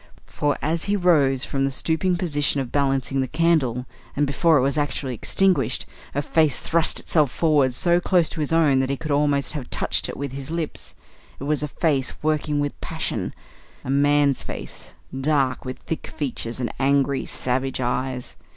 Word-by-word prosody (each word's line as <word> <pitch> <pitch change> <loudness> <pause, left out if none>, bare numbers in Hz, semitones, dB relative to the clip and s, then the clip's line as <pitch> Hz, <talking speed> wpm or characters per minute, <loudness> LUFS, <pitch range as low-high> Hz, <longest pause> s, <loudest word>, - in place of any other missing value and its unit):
For, 145 -1 -1
as 160 +3 0
he 205 - +1
rose 145 -8 +3
from 135 -1 -1
the 135 - +2
stooping 165 +6 0
position 145 -5 0
of 130 -3 -4
balancing 135 -1 +1
the 130 - -1
candle, 150 -6 +1 0.3
and 145 - +2
before 155 +3 +3
it 130 - +2
was 140 +2 +1
actually 145 -3 -1
extinguished, 190 - +1 0.3
a 145 - 0
face 155 -2 +2
thrust 165 -1 +2
itself 150 -4 +2
forward 145 -4 +2
so 175 +5 +3
close 175 -2 +2
to 165 - -7
his 150 -1 -1
own 155 -5 +4
that 130 0 0
he 140 - -1
could 155 0 -5
almost 145 -1 +1
have 145 -5 -6
touched - - -1
it - - -6
with 140 -1 -4
his 135 +2 -6
lips. 165 -2 -4 0.4
It - - -7
was 150 +1 0
a 150 - -1
face 140 -4 0
working 150 -1 0
with 145 0 -3
passion; - - -3 0.5
a 130 - -2
man's 145 0 +3
face, - - -8 0.2
dark, 135 -2 +1
with 130 0 -5
thick 160 - -5
features, 125 -4 -4
and 120 - -3
angry, 140 0 +1
savage 130 +1 -1
eyes. 125 0 -2
145 Hz, 180 wpm, -23 LUFS, 135-155 Hz, 0.5 s, own